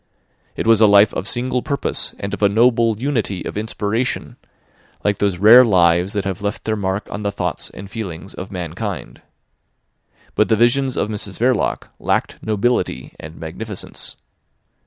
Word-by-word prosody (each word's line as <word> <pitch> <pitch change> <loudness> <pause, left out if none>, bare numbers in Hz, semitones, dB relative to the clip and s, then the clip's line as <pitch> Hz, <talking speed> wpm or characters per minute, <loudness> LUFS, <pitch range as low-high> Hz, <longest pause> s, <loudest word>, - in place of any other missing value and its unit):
It - - -3
was 115 -1 +5
a 110 - +8
life 100 0 +6
of 95 - -3
single 125 +2 0
purpose 140 -1 -2
and 100 - -4
of - - -5
a 100 - +5
noble 115 0 +3
unity 115 -8 -2
of - - -5
inspiration, 110 +3 -2 0.7
like 105 -1 +1
those 100 -3 +1
rare 110 +7 +9
lives 90 -3 +3
that 100 -2 -1
have 95 -1 -3
left 100 +1 -3
their 110 - -1
mark 100 0 -2
on 105 - -4
the 100 -1 -1
thoughts 90 -4 -3
and 100 - -10
feelings 95 -4 -7
of 95 - -8
mankind. 90 +2 -5 1.1
But 105 - +2
the 110 - +4
visions 125 +4 +2
of 105 - 0
Mrs 100 -2 -6
Verloc 125 -1 0
lacked - - -1
nobility 110 +3 -1
and 80 +1 -9
magnificence. 90 +6 -7
105 Hz, 160 wpm, -20 LUFS, 95-115 Hz, 1.1 s, rare